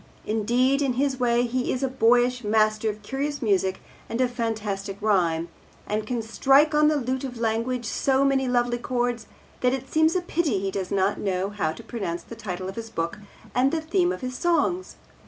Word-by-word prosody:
Indeed, 245 +6 +2
in 270 -3 +1
his 265 +1 0
way 240 -1 +3
he 250 +1 -1
is 260 - -2
a - - +2
boyish 245 0 +3
master 215 +1 +2
of 210 0 -6
curious 285 +2 -3
music 190 -4 +1 0.3
and 230 - -3
of 255 -1 +2
fantastic 210 -5 -3
rhyme, 170 -6 +1 0.4
and 210 +1 -2
can 240 -1 -2
strike 275 +7 +4
on 300 0 +5
the 305 - +3
lute 260 -1 -1
of 250 -3 -5
language 230 +2 -1
so 270 +5 +1
many 270 -1 +2
lovely 240 -1 +1
chords 245 -1 -1 0.3
that 250 0 +2
it 265 0 -5
seems 315 +2 +3
a 365 - +2
pity 330 - 0
he 195 0 -2
does 190 -2 -3
not 195 +1 +1
know 190 -1 -1
how 195 -7 -1
to 230 - -11
pronounce 185 -7 -4
the 230 - -10
title 185 -5 -5
of 190 - -7
his 225 0 -5
book 170 -3 -3 0.3
and 260 +2 +3
the 330 - 0
theme 350 +3 +1
of - - -5
his 255 0 -4
songs. 350 +3 0
240 Hz, 200 wpm, -25 LUFS, 210-265 Hz, 0.4 s, on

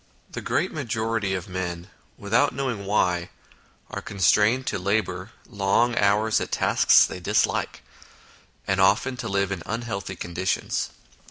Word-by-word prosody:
The - - -5
great - - 0
majority 110 -3 -2
of 90 +2 -5
men, 90 -2 -4 0.3
without 125 +7 +1
knowing 125 -7 -3
why, 90 -4 +1 0.6
are - - -4
constrained 105 +6 +2
to 100 - -2
labour 95 0 -1 0.2
long 110 +3 +1
hours 105 +1 +2
at - - -4
tasks - - +5
they - - -6
dislike, 90 - 0 0.8
and 95 0 +1
often 105 +7 +3
to 115 - -4
live 100 -1 0
in 95 -4 -3
unhealthy 105 -4 -4
conditions. 85 +1 -2
100 Hz, 135 wpm, -25 LUFS, 95-110 Hz, 0.8 s, tasks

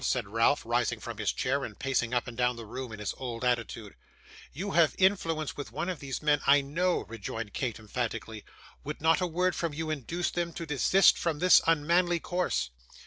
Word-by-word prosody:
said 125 -5 0
Ralph, 115 +7 +2
rising 120 0 0
from - - -7
his - - +1
chair, 135 +2 -1
and 105 - -7
pacing 125 -3 0
up 125 -1 0
and 120 - -7
down 125 +1 +1
the 115 -1 -8
room 125 +2 -6
in 110 - -7
his 105 -1 -3
old 125 -2 -4
attitude. 115 -4 -2 0.6
'You 195 +7 -4
have 170 -4 +4
influence 165 -6 +1
with 145 - -7
one 175 - -3
of 180 -5 -4
these 135 +1 -5
men, 145 -1 +3
I 140 +1 +6
KNOW,' 170 +6 0
rejoined 110 0 -6
Kate, 125 -4 -2
emphatically. 110 -1 -4 0.4
'Would 150 +1 -5
not 160 +3 +3
a 180 - +1
word 180 +2 0
from 165 -4 -2
you 160 0 -3
induce 160 +5 -2
them 170 -1 -2
to 170 - -5
desist 160 +6 +4
from 165 -3 -1
this 180 +3 +6
unmanly 170 +2 +3
course? 165 - -1
140 Hz, 200 wpm, -29 LUFS, 115-170 Hz, 0.6 s, I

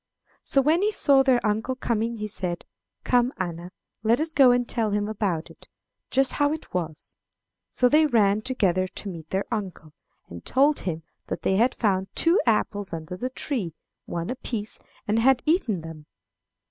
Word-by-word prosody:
"So 275 - +2
when 315 +5 +3
he 420 +1 +2
saw 280 -9 +4
their 260 -3 +2
uncle 220 +5 0
coming 235 -2 -1
he 215 -1 -4
said, 180 -4 -4 0.4
'Come, 245 0 +2
Anna, 175 -2 -5 0.3
let 225 +3 +2
us 315 +1 -1
go 270 -4 +7
and 245 0 +2
tell 225 -3 0
him 205 0 0
about 195 -6 -2
it, - - -17 0.4
just 270 0 +3
how 290 0 +2
it 315 - -8
was. 165 -4 -4 0.5
So 250 - +2
they 305 +4 +4
ran 215 -5 +3
together 190 -7 +1
to 200 - -6
meet 165 -4 -9
their 190 +1 -1
uncle, 185 -8 -5 0.3
and 85 0 -10
told 285 +3 +3
him 160 -1 -5 0.2
that - - -5
they 190 - +2
had 240 +4 +3
found 190 -4 0
two 340 +3 +3
apples 205 -3 0
under 165 +2 -5
the 250 +8 -3
tree, 235 - -3 0.3
one 170 +5 -3
apiece, 225 -4 -4 0.3
and 215 +2 +2
had 255 +1 +3
eaten 280 - +1
them. 160 -2 -10
215 Hz, 175 wpm, -25 LUFS, 185-260 Hz, 0.5 s, go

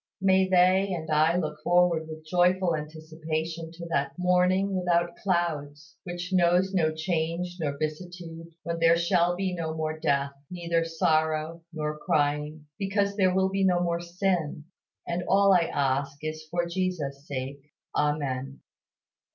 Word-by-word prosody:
May 190 -1 +4
they 185 +2 +4
and 160 -1 -5
I 155 +3 +3
look 150 -3 -3
forward 175 -2 +3
with 155 0 -9
joyful 180 +1 +2
anticipation 160 +1 -5
to 170 0 -8
that 140 -2 -1
"morning 180 +2 +2
without 175 -1 +1
clouds," 155 -6 -2
which 175 +1 -5
knows 180 +1 +3
no 160 -4 +2
change 170 +2 -2
nor 145 -3 -2
vicissitude, 165 +2 -5 0.2
when 170 -1 -3
there 165 0 +5
shall 175 0 +2
be 190 0 -2
no 160 -2 -3
more 155 0 -3
death, 140 -3 +1 0.2
neither 170 -2 -1
sorrow, 160 0 0
nor 150 -2 -3
crying, 150 +1 0
because 200 0 0
there 190 -3 +3
will 190 0 +3
be 195 0 0
no 180 -2 +3
more 170 -1 0
sin; 175 -4 -1 0.4
and 175 +1 -1
all 200 0 +5
I 170 -3 +3
ask 140 +1 -1
is 155 0 -5
for 175 +1 0
Jesus' 170 -6 -3
sake. 135 +1 -5 0.3
Amen. 140 -3 -1
170 Hz, 145 wpm, -27 LUFS, 155-180 Hz, 0.4 s, there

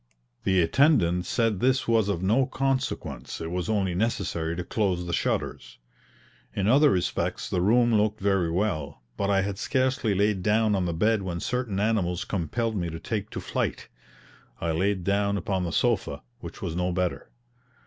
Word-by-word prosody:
The 95 -2 +4
attendant 90 - +3
said 115 -4 +1
this 130 +3 +2
was 115 -3 +3
of 95 -3 -1
no 120 +7 +3
consequence, 135 -1 -2
it 80 0 -5
was 90 +1 -2
only 100 -4 +1
necessary 90 -5 -1
to 90 - -3
close 95 -3 -1
the 85 - -4
shutters. 60 -6 -2 0.8
In 100 0 0
other 145 +6 +6
respects 90 -7 -1
the 90 - -1
room 120 +4 +4
looked 105 0 +2
very 95 -4 +1
well 80 - -2
but 100 - -1
I 100 -1 +3
had 100 0 -4
scarcely 130 -5 0
laid 100 0 +1
down 110 +2 +2
on 95 -2 +1
the 85 - -1
bed 105 +5 +2
when 90 -3 -4
certain 120 -2 -2
animals 100 -4 0
compelled 110 +5 -2
me 85 -4 -2
to 80 0 -6
take 110 0 -3
to - - -5
flight. - - -3 0.7
I 85 - -1
laid 95 +3 0
down 100 +1 +1
upon 95 -1 -1
the 85 - -3
sofa, 115 +1 0 0.2
which - - -9
was 80 - -3
no 90 +1 0
better. 90 0 -2
100 Hz, 175 wpm, -26 LUFS, 90-110 Hz, 0.8 s, other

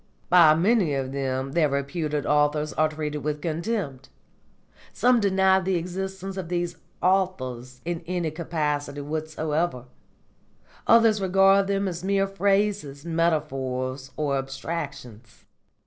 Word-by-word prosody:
By 170 -4 +7
many 180 -3 +2
of 135 -1 -2
them 135 -1 -2
their 155 -1 +2
reputed 145 +1 -2
authors 150 0 +1
are 155 +2 +2
treated 150 -1 -4
with 150 +1 -3
contempt; 160 - -3 0.8
some 245 0 +3
deny 190 -2 +3
the 190 0 -1
existence 190 +2 -4
of 180 -3 -5
these 175 -1 -2 0.3
'authors' 130 -10 0
in 170 -1 -3
any 175 -3 -1
capacity 150 -3 -2
whatsoever; 155 -2 -2 1.0
others 225 -3 +5
regard 195 +1 +4
them 200 0 0
as 175 -1 -5
mere 195 0 +2
phrases, 195 -7 0
metaphors, 135 -6 -1
or 140 -3 0
abstractions. 135 -5 -7
160 Hz, 115 wpm, -25 LUFS, 140-190 Hz, 1.0 s, By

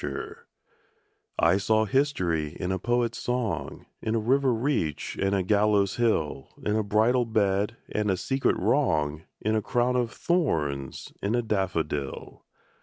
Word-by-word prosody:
SYMBOLS 70 -1 -4 1.0
I 85 +3 +4
saw 110 +2 +2
history 95 - 0
in 90 0 -2
a 95 - -1
poet's 120 +3 0
song, 125 -3 -3 0.2
In 110 +1 -1
a - - +2
river 130 +4 +2
reach 115 - -1
and 100 +1 +2
a 95 - +1
gallows 100 0 +2
hill, 80 - 0 0.2
In 105 - +1
a 110 - +2
bridal 110 +4 +3
bed, 105 0 +1
and 105 -1 -1
a 95 - +1
secret 135 +6 0
wrong, 80 - +1 0.2
In 110 +1 +1
a 110 - +1
crown 125 +3 +1
of 120 -2 0
thorns: 75 - -1
in 105 +4 0
a 120 - +1
daffodil. 80 -10 -2
105 Hz, 150 wpm, -27 LUFS, 90-120 Hz, 1.0 s, I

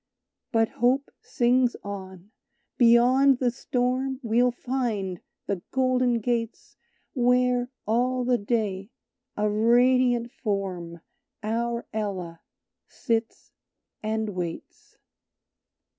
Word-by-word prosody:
But 225 -1 +2
Hope 255 +4 +1
sings 245 0 +2
on: 190 -1 -8 0.5
"Beyond 250 +3 +5
the 250 -1 +1
storm 255 +1 -1
We'll 240 +2 +3
find 235 -8 -3 0.2
the 195 -3 -3
golden 255 -2 +1
gates 230 0 -3 0.4
Where, 250 -1 +2 0.2
all 250 +3 +1
the 245 -1 +2
day, 200 -2 -2 0.5
a 210 0 +1
radiant 240 +2 +3
Form, 185 -7 -4 0.4
Our 235 +2 -2
Ella, 190 -6 -4 0.5
sits 230 -2 -3 0.5
and 220 0 -2
waits." 175 -4 -7
235 Hz, 90 wpm, -26 LUFS, 210-250 Hz, 0.5 s, Beyond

